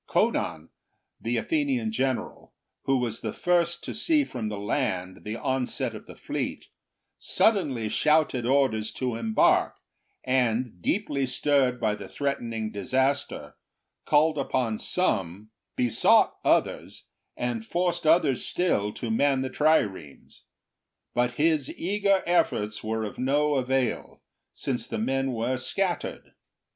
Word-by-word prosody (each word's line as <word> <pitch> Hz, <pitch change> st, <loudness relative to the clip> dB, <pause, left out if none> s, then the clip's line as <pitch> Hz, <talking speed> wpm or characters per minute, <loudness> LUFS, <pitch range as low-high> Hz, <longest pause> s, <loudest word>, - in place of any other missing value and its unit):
Conon, 80 Hz, +1 st, 0 dB, 0.5 s
the 115 Hz, +1 st, -1 dB
Athenian 275 Hz, -, 0 dB
general, 135 Hz, -, -3 dB, 0.3 s
who 135 Hz, 0 st, +3 dB
was 115 Hz, -2 st, -2 dB
the 110 Hz, -, -3 dB
first 175 Hz, -1 st, +1 dB
to -, -, -5 dB
see 305 Hz, +6 st, +2 dB
from 120 Hz, -, -5 dB
the 105 Hz, -, -4 dB
land 100 Hz, -4 st, -2 dB
the 105 Hz, +1 st, -4 dB
onset 130 Hz, +1 st, -2 dB
of -, -, -10 dB
the -, -, -11 dB
fleet, -, -, -4 dB, 0.5 s
suddenly 150 Hz, -, +1 dB
shouted 150 Hz, 0 st, +2 dB
orders 120 Hz, -4 st, +1 dB
to 125 Hz, -3 st, -2 dB
embark, 115 Hz, -1 st, +2 dB, 0.5 s
and 125 Hz, -5 st, 0 dB
deeply 145 Hz, -, 0 dB
stirred 130 Hz, -1 st, +1 dB
by 110 Hz, -2 st, +1 dB
the 100 Hz, -2 st, -8 dB
threat 140 Hz, +8 st, -2 dB
ening 115 Hz, -2 st, -4 dB
disaster, 130 Hz, +7 st, -1 dB, 0.5 s
called 155 Hz, 0 st, +3 dB
upon 125 Hz, -5 st, -1 dB
some, 105 Hz, -, -1 dB, 0.2 s
besought 125 Hz, -2 st, +3 dB
others, -, -, 0 dB, 0.3 s
and 120 Hz, -2 st, -2 dB
forced 175 Hz, +5 st, -1 dB
others 155 Hz, -5 st, +4 dB
still 105 Hz, -, +1 dB
to 115 Hz, -, -4 dB
man 135 Hz, +3 st, +2 dB
the 130 Hz, -, -4 dB
triremes. 105 Hz, -, 0 dB, 0.7 s
But 120 Hz, 0 st, 0 dB
his 155 Hz, -2 st, +2 dB
eager 200 Hz, +1 st, +1 dB
efforts 110 Hz, -11 st, 0 dB
were 110 Hz, 0 st, -2 dB
of 105 Hz, -, -6 dB
no 145 Hz, +3 st, +2 dB
avail, 130 Hz, -1 st, -1 dB, 0.3 s
since 120 Hz, -4 st, -3 dB
the -, -, -4 dB
men 135 Hz, +4 st, 0 dB
were 120 Hz, +3 st, -1 dB
scattered. 180 Hz, +7 st, -3 dB
130 Hz, 130 wpm, -26 LUFS, 110-150 Hz, 0.7 s, others